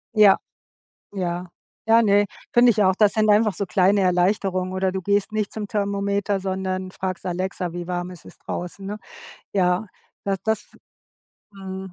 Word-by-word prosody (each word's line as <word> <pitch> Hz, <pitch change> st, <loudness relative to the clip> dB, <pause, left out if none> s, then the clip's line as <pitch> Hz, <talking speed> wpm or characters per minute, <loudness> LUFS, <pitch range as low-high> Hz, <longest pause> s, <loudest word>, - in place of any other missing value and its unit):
Ja. 210 Hz, -2 st, +7 dB, 0.8 s
Ja. 180 Hz, -1 st, -3 dB, 0.4 s
Ja, 230 Hz, +1 st, +7 dB
ne, 205 Hz, -2 st, +4 dB, 0.3 s
finde 240 Hz, 0 st, +7 dB
ich 210 Hz, -1 st, +2 dB
auch. 185 Hz, 0 st, +4 dB
Das 210 Hz, -2 st, +4 dB
sind 215 Hz, -1 st, +2 dB
einfach 210 Hz, -1 st, +4 dB
so 200 Hz, -, -3 dB
kleine 190 Hz, +2 st, +3 dB
Erleichterung. 185 Hz, 0 st, +1 dB
Oder 190 Hz, 0 st, 0 dB
du 190 Hz, -1 st, -3 dB
gehst 205 Hz, +2 st, +1 dB
nicht 215 Hz, -2 st, -1 dB
zum 210 Hz, -2 st, -4 dB
Thermometer, 200 Hz, -1 st, -1 dB
sondern 185 Hz, 0 st, -3 dB
fragst 185 Hz, -1 st, -4 dB
Alexa, 180 Hz, -1 st, -3 dB
wie 175 Hz, 0 st, -6 dB
warm 175 Hz, 0 st, -3 dB
ist 180 Hz, -, -12 dB
es -, -, -14 dB
draußen, 185 Hz, +2 st, -6 dB
ne? 210 Hz, +1 st, -5 dB, 0.6 s
Ja, 185 Hz, +2 st, +2 dB, 0.4 s
das 195 Hz, -1 st, 0 dB
das 220 Hz, 0 st, -1 dB, 0.8 s
Mhm, 190 Hz, -1 st, -7 dB
195 Hz, 160 wpm, -23 LUFS, 185-205 Hz, 0.8 s, Ja